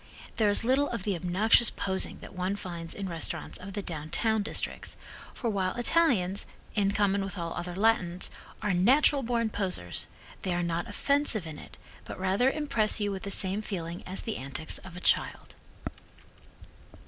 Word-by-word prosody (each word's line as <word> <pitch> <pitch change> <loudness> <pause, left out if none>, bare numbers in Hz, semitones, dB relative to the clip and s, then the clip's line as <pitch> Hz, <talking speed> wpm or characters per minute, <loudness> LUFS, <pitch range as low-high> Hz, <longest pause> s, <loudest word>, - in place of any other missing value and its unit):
There 215 -2 +4
is 205 - +2
little 265 +4 +3
of 235 -6 -4
the 200 -2 0
obnoxious 195 +7 +4
posing 190 -1 -1
that - - -10
one 185 +1 -1
finds 170 -4 -4
in 200 -1 -3
restaurants 165 -3 -3
of 195 +1 -8
the 205 0 -3
downtown 170 +8 0
districts, 205 - -4 0.4
for 240 - -3
while 190 -4 0
Italians, 240 - +2 0.3
in 200 -2 +2
common 200 -1 +2
with 195 0 -5
all 170 -1 -3
other 175 0 -5
Latins, 185 -4 +2 0.3
are 210 -2 +1
natural 270 +10 +4
born 230 -2 0
poseurs, 90 - -2 0.3
they 180 -2 -1
are 175 - 0
not 170 0 -1
offensive 280 - +2
in 155 -2 -7
it, - - -13 0.3
but - - -8
rather 190 +7 +3
impress 250 -8 +1
you 205 -1 0
with 190 -1 -4
the 200 - -5
same 195 +1 +1
feeling 175 -4 -5
as 185 +1 -1
the 225 - -3
antics 140 +4 -3
of 180 -2 -11
a - - -8
child. - - +1
195 Hz, 170 wpm, -29 LUFS, 180-220 Hz, 0.4 s, There